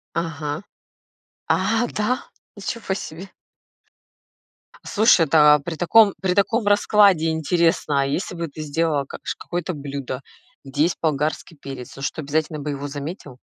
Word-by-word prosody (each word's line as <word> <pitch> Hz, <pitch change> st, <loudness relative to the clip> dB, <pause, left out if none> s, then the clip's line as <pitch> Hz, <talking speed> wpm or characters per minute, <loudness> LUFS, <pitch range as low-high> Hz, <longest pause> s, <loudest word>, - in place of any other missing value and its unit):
Ага. 160 Hz, -1 st, -3 dB, 0.9 s
А, 225 Hz, +5 st, +2 dB
да? 225 Hz, +5 st, -1 dB, 0.3 s
Ничего 205 Hz, -1 st, -4 dB
себе. 185 Hz, 0 st, -7 dB, 1.5 s
Слушай, 215 Hz, -6 st, +4 dB
да, 150 Hz, 0 st, +7 dB
а 150 Hz, -, 0 dB
при 160 Hz, +4 st, -5 dB
таком 200 Hz, +5 st, +5 dB
при 190 Hz, -1 st, +1 dB
таком 205 Hz, +3 st, +1 dB
раскладе 205 Hz, -5 st, +4 dB
интересно, 160 Hz, -2 st, +1 dB
а -, -, +1 dB
если 145 Hz, +7 st, -2 dB
бы 170 Hz, -1 st, -3 dB
ты 155 Hz, +1 st, -9 dB
сделала 150 Hz, -1 st, 0 dB
как -, -, -10 dB
ш -, -, -3 dB
какое-то 175 Hz, +1 st, -4 dB
блюдо, 140 Hz, -2 st, -5 dB, 0.4 s
где 140 Hz, +2 st, 0 dB
есть 170 Hz, +2 st, 0 dB
болгарский 155 Hz, +1 st, -1 dB
перец, 135 Hz, -3 st, -9 dB
он 135 Hz, -, -8 dB
что 155 Hz, -, -2 dB
обязательно 155 Hz, +1 st, -1 dB
бы 150 Hz, +1 st, -3 dB
его 140 Hz, 0 st, -4 dB
заметил? 145 Hz, -2 st, -7 dB
160 Hz, 145 wpm, -22 LUFS, 145-190 Hz, 1.5 s, да